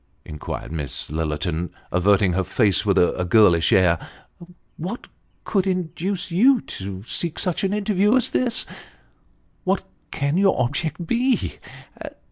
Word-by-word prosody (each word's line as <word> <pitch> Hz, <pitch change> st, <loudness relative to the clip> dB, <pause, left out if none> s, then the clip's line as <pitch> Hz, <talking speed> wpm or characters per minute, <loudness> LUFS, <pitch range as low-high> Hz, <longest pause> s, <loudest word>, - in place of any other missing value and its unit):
" -, -, -41 dB
inquired 75 Hz, 0 st, -6 dB
Miss 75 Hz, -4 st, -4 dB
Lillerton, 80 Hz, +2 st, -2 dB, 0.2 s
averting 95 Hz, +1 st, +3 dB
her 95 Hz, +1 st, +1 dB
face, 100 Hz, +1 st, +1 dB
with 100 Hz, -1 st, +3 dB
a 90 Hz, 0 st, +2 dB
girlish 90 Hz, -3 st, +4 dB
air, 90 Hz, -3 st, +4 dB, 0.4 s
" 170 Hz, -, -12 dB, 0.3 s
what 190 Hz, +9 st, -5 dB, 0.4 s
could 195 Hz, -2 st, 0 dB
induce 185 Hz, +1 st, -2 dB
you 245 Hz, +9 st, +5 dB
to 95 Hz, 0 st, -7 dB
seek 165 Hz, +7 st, -4 dB
such 180 Hz, 0 st, -2 dB
an 195 Hz, -, +1 dB
interview 205 Hz, +1 st, +2 dB
as 255 Hz, -, +1 dB
this? 245 Hz, -2 st, +1 dB, 1.0 s
What 190 Hz, 0 st, 0 dB, 0.3 s
can 140 Hz, +3 st, -1 dB
your 195 Hz, 0 st, +3 dB
object 155 Hz, +6 st, -2 dB
be 245 Hz, +7 st, 0 dB
140 Hz, 135 wpm, -22 LUFS, -, 1.0 s, you